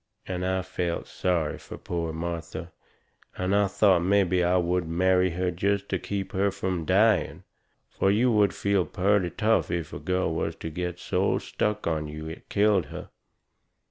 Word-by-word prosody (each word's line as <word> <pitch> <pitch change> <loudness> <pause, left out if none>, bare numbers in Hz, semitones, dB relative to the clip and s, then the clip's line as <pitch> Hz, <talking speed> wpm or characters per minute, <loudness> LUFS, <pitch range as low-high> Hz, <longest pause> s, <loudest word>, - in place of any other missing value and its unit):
And 90 -1 -3
I 95 0 0
felt 90 -2 -3
sorry 85 -5 -1
fur - - -9
poor 85 -2 -3
Martha, 85 0 -5 0.7
and 90 +2 0 0.2
thought 95 -3 +4
mebby 95 -1 +3
I 90 +1 +3
would 90 -1 0
marry 90 +2 +3
her 90 +1 -1
jest 100 +3 -1
to 95 - 0
keep 100 +1 -4
her 100 +2 +1
from 95 -3 -3
dying. 105 +4 +2 0.5
Fur 95 - +1
you 115 +5 +3
would 105 -2 +4
feel 100 -2 +1
purty 95 +2 +1
tough 110 +5 +1
if 85 -3 -3
a - - -5
girl 90 -3 0
was 80 - -2
to 80 - -6
get 90 +2 -3
so - - 0
stuck 105 0 -2
on 80 -2 -1
you 75 +1 -7
it 80 - -9
killed 100 -3 +3
her. - - -9
90 Hz, 170 wpm, -27 LUFS, 85-100 Hz, 0.7 s, thought